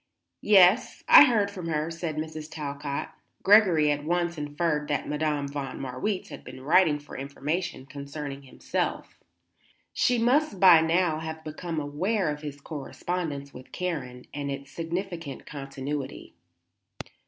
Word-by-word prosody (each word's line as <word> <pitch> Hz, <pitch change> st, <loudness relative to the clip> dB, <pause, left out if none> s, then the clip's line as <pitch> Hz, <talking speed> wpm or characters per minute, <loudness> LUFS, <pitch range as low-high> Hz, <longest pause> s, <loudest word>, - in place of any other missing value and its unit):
"Yes; 205 Hz, +3 st, +5 dB
I -, -, +10 dB
heard 210 Hz, -6 st, +2 dB
from 180 Hz, -4 st, -6 dB
her," 155 Hz, 0 st, -1 dB
said 165 Hz, -1 st, -4 dB
Mrs. 155 Hz, 0 st, -5 dB
Talcott. 145 Hz, -2 st, -4 dB, 0.3 s
Gregory 185 Hz, -8 st, +6 dB
at 145 Hz, 0 st, -2 dB
once 170 Hz, +2 st, 0 dB
inferred 150 Hz, 0 st, -1 dB
that 145 Hz, -2 st, -1 dB
Madame 150 Hz, -1 st, -1 dB
von 140 Hz, -2 st, -5 dB
Marwitz 135 Hz, +10 st, -3 dB
had -, -, -9 dB
been 130 Hz, 0 st, -10 dB
writing 155 Hz, +2 st, +4 dB
for 145 Hz, 0 st, -12 dB
information 140 Hz, +2 st, -3 dB
concerning 140 Hz, 0 st, -7 dB
himself. 135 Hz, -, -4 dB, 0.7 s
She 245 Hz, -, +2 dB
must 245 Hz, -1 st, +2 dB
by 175 Hz, -4 st, +8 dB
now 165 Hz, -1 st, +2 dB
have 160 Hz, 0 st, -6 dB
become 160 Hz, +1 st, -4 dB
aware 165 Hz, +5 st, -1 dB
of 150 Hz, 0 st, -6 dB
his 145 Hz, -2 st, -7 dB
correspondence 145 Hz, 0 st, -5 dB
with 130 Hz, -, -12 dB
Karen 135 Hz, -9 st, -4 dB
and 145 Hz, -1 st, -4 dB
its 140 Hz, 0 st, -6 dB
significant 165 Hz, -3 st, -5 dB
continuity. 135 Hz, -1 st, -6 dB
155 Hz, 135 wpm, -27 LUFS, 140-175 Hz, 0.7 s, I